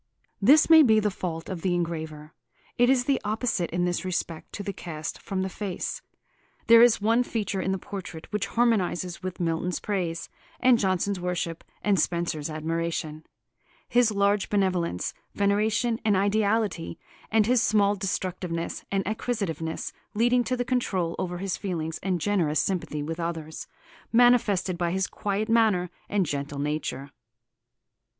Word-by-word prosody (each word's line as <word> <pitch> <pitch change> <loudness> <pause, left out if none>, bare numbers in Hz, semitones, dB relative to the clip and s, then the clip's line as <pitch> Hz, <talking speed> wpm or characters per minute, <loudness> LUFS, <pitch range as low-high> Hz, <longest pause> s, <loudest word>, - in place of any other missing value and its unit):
This 285 +10 +6
may 320 -1 +9
be 220 -6 +5
the 210 -1 0
fault 165 -3 -5
of 185 -4 -5
the 180 -1 +1
engraver. 160 -3 -4 0.4
It 245 +1 +4
is 255 -2 +3
the 275 -1 +1
opposite 215 -4 -1
in 175 +1 0
this 175 +1 -1
respect 170 -3 -3
to 205 - -5
the 200 - -4
cast 155 -4 -6
from 190 -1 -2
the - - -1
face. 190 -1 -4 0.6
There 230 0 +8
is 240 -1 +6
one 225 +3 +3
feature 210 -5 -2
in 190 - -1
the 190 - 0
portrait 185 -4 -7
which 210 -1 0
harmonises 185 -7 0
with 185 -1 -5
Milton's 170 +1 -1
praise 175 -5 -2 0.3
and 250 -2 +5
Jonson's 190 0 0
worship 175 -2 -3 0.2
and 200 -3 +3
Spenser's 170 -2 -1
admiration, 160 0 -3 0.6
his 245 -2 +4
large 200 -1 +1
benevolence, 185 - 0 0.2
veneration 220 +3 +1
and 210 -3 +3
ideality, 205 -3 0 0.3
and 220 -1 +3
his 245 +1 +3
small 205 -2 +3
destructiveness 185 -3 -3
and 195 -1 0
acquisitiveness, 200 - -3 0.2
leading 240 +3 +3
to 255 - -1
the 245 - -1
control 195 -9 0
over 180 -1 -2
his 190 0 -2
feelings 165 -5 -3
and 185 -2 -1
generous 165 -5 +1
sympathy 165 -6 -1
with 165 +3 -5
others, 165 -2 -4 0.4
manifested 225 -7 +3
by 175 -1 +1
his 190 +2 0
quiet 205 +3 -2
manner 215 -6 +3 0.2
and 200 -3 +1
gentle 140 -1 -4
nature. 145 -1 -3
190 Hz, 150 wpm, -26 LUFS, 170-215 Hz, 0.6 s, may